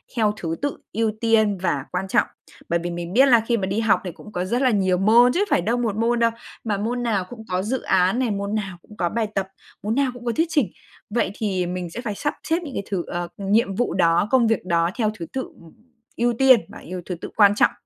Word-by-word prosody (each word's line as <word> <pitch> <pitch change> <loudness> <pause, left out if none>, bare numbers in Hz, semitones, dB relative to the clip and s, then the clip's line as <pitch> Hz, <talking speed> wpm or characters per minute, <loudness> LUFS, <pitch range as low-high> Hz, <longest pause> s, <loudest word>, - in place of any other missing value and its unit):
theo 215 -3 +2
thứ 165 -1 -3
tự 285 0 -2 0.2
ưu 225 0 +1
tiên 220 -3 +3
và 145 -7 -1
quan 185 +1 -2
trọng, - - +2 0.4
bởi 170 - +2
vì 175 - -2
mình 170 +1 -5
biết 260 +5 +6
là 240 -3 +6
khi 235 - +2
mà 195 - -1
đi 200 +3 -1
học 220 -3 +3
thì 180 - -4
cũng 210 - -13
có 180 -2 -2
rất 240 +7 0
là 260 - +4
nhiều 190 -5 +2
môn 230 +6 +5
chứ 400 +4 +2
phải - - +3
đâu 230 +7 0
1 230 -4 -1
môn 235 +1 +1
đâu, 230 0 +3 0.3
mà 210 -3 -1
môn 240 +4 -2
nào 210 -6 0
cũng 235 -3 -9
có 180 0 0
dự 245 +7 -2
án 190 +5 +2
này, 250 -4 +1
môn 200 +1 -2
nào 195 -4 -3
cũng 210 - -16
có 175 -2 0
bài 225 +3 -1
tập, 195 -1 0 0.4
môn 215 +2 -1
nào 275 -1 +2
cũng 245 -1 -11
có 235 - +1
thuyết 325 +7 +1
trình. 295 -9 +1 0.4
Vậy 215 -3 0
thì 190 -5 -1
mình 180 0 -4
sẽ 230 - -6
phải 215 -5 -4
sắp 295 +7 -2
xếp 325 - +1
những 285 -5 -7
cái - - -2
thứ, 185 -3 0
ờ, 175 0 -3
nhiệm 200 0 +1
vụ 245 -2 0
đó, 175 +1 +3
công 255 -3 +4
việc 220 -5 0
đó 170 -1 +2
theo 215 -3 +1
thứ 165 - -4
tự, 265 - -1 0.2
ừm, 165 -1 -16 0.4
ưu 240 +1 +2
tiên 260 0 +6
và - - -11
ưu 180 0 -5
thứ 180 - -4
tự - - -6
quan 205 -2 +6
trọng. - - +4
210 Hz, 265 wpm, -23 LUFS, 185-240 Hz, 0.4 s, biết